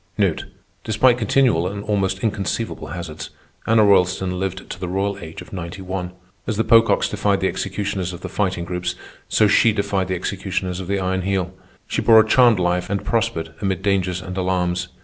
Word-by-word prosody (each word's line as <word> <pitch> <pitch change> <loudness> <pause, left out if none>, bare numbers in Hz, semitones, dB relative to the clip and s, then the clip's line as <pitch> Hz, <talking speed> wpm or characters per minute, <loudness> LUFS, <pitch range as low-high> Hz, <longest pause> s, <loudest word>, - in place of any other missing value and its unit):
Despite 120 +3 +3
continual 110 -6 +2
and 100 +1 -5
almost 100 -2 -1
inconceivable 110 +1 -2
hazards, 85 -3 -7 0.4
Anna 110 -1 +5
Roylston 95 -2 +2
lived 95 0 -4
to - - -7
the 90 - -4
royal 100 +2 -1
age 80 -2 -8
of - - -16
ninety 90 +1 -6
one. 90 -1 -4 0.3
As 110 - -1
the 110 - +2
Pococks 115 0 +4
defied 100 -1 0
the 95 - +1
executioners 95 -2 -3
of 90 0 -9
the - - -5
Fighting 95 -4 -1
Groups, 90 0 -3 0.3
so 110 - +4
she 110 +2 +5
defied 100 -3 -1
the 95 - -1
executioners 95 0 -3
of 95 - -6
the 100 +1 0
Iron 95 0 -1
Heel. 95 -1 -1 0.3
She - - -2
bore 110 -1 +7
a 110 - +5
charmed 120 -1 +5
life 90 0 0
and 100 0 -2
prospered 110 -9 -1
amid 95 -2 -1
dangers 95 -2 0
and 95 -1 -6
alarms. 90 -1 -1
95 Hz, 185 wpm, -21 LUFS, 90-105 Hz, 0.4 s, bore